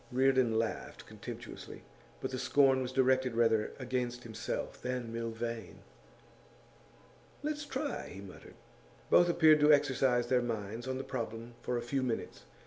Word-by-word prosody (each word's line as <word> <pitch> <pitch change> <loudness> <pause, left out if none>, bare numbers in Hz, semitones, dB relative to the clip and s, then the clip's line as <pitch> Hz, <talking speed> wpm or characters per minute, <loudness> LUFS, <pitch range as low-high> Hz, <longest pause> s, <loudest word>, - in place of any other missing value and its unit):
Reardon 130 -3 +3
laughed 115 0 -3
contemptuously, - - -9 0.4
but - - -3
the 130 - -3
scorn 135 0 +4
was 125 0 -3
directed 130 -2 +2
rather 115 -2 +2
against 125 -1 -2
himself 110 -2 -5
than 125 -2 -3
Milvain. 115 -2 -4 1.6
'Let's 300 0 -2
try,' - - -3
he - - -8
muttered. - - -12 0.6
Both 175 - +6
appeared 160 -2 +6
to 150 +1 +6
exercise 135 -4 +3
their 125 -1 +2
minds 115 0 -4
on 130 0 -2
the 135 - -4
problem 115 -2 -5
for 125 - -1
a 120 - -3
few 135 +3 -1
minutes. 125 -3 -3
125 Hz, 140 wpm, -32 LUFS, 115-130 Hz, 1.6 s, Both